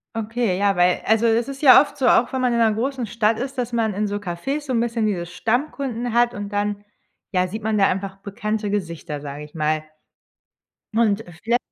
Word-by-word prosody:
Okay, 225 -3 -1
ja, 200 -1 +2
weil 180 0 +3
also, 225 +1 +3
es 230 +1 +2
ist 275 +1 -7
ja 265 -1 +9
oft 290 - -5
so, 260 - +1
auch 240 0 +4
wenn 260 - 0
man 250 -1 +2
in 235 - +1
'ner 225 -1 +4
großen 255 +1 -2
Stadt 220 0 +1
ist, 265 +2 -5
dass 245 -1 -3
man 220 -3 0
in 210 +2 0
so 205 0 -2
Cafés 205 +11 -3
so - - -2
'n 240 - +2
bisschen 230 -1 0
diese 180 -5 -1
Stammkunden 240 - -2
hat 240 +1 +3
und 205 0 -5
dann, 205 0 -2 0.5
ja, 185 -2 +1
sieht 215 +4 -6
man 215 -1 +1
da 195 - +5
einfach 195 +1 -3
bekannte 210 +2 -3
Gesichter, 170 -6 -4
sage 145 0 -7
ich 150 +1 -14
mal. 155 0 0 1.1
Und 220 -1 +2 0.2
vielleicht 235 +2 +2
220 Hz, 215 wpm, -22 LUFS, 195-240 Hz, 1.1 s, ja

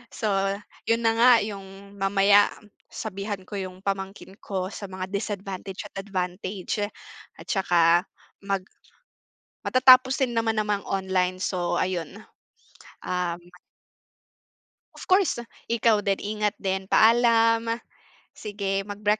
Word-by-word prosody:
So, 215 - -1 0.6
yun 230 +1 +2
na 225 - +4
nga 245 +2 +7
yung 200 -1 -9
mamaya 200 +1 +5 0.4
sabihan 200 -1 -5
ko 205 +2 -7
yung 185 0 -7
pamangkin 195 0 -4
ko 190 -2 -3
sa 205 - -7
mga 185 0 -6
disadvantage 195 -2 -4
at - - -13
advantage. 185 0 -4 0.6
At - - -14
saka 175 -2 +3 0.3
mag 195 -1 -2 1.0
matatapos 255 +1 +6
din 240 -2 0
naman 225 -1 +1
naman 210 -1 -1
ang 190 -1 -3
online. 185 0 +1
So, 180 -2 -1
ayun. 185 +2 -3 0.8
Um 175 -1 -2 1.5
Of - - -11
course. 370 -10 +3 0.2
Ikaw 225 -3 +2
din, 195 -1 0
ingat 210 0 -1
din. 190 -1 -1
Paalam! 230 +1 +4 0.5
Sige, 200 -2 -3
magbreak 205 +1 -8
200 Hz, 115 wpm, -25 LUFS, 190-220 Hz, 1.5 s, nga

